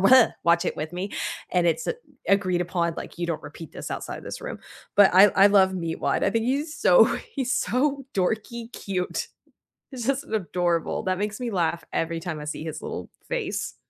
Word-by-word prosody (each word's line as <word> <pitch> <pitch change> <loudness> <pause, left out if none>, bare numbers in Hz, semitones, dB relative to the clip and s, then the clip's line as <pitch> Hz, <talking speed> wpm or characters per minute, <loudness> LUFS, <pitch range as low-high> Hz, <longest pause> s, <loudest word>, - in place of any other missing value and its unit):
w 245 +5 +8 0.2
watch 170 0 +4
it - - -2
with 155 +2 -4
me, 185 +3 -4 0.4
and 175 -1 +2
it's 165 -1 +1
a 470 - -1 0.3
agreed 185 -3 +3
upon, 170 -2 0
like, - - -8
"You 175 - -1
don't 160 -2 -3
repeat 150 +1 -10
this - - -7
outside - - -4
of - - -12
this - - -6
room." - - -6 0.4
But 200 -2 +7
I 190 +2 +9
I 195 +1 +6
love 190 -2 +5
Meatwad, 165 -3 -1
I 195 - +3
think 225 +1 0
he's 290 +5 -1
so, - - +7 0.3
he's 265 -2 -1
so 275 +1 0
dorky 225 +5 -2
cute. 185 -2 -3 0.6
He's 250 -4 -6
just 275 +1 0
adorable, 175 -5 0
that 185 -1 0
makes 210 +3 -3
me 245 -1 -2
laugh 170 -4 0
every 165 0 -1
time 165 -3 -5
I 150 - -7
see 150 +1 -5
his 160 -2 -5
little - - -5 0.2
face. - - -3
190 Hz, 200 wpm, -25 LUFS, 170-230 Hz, 0.6 s, I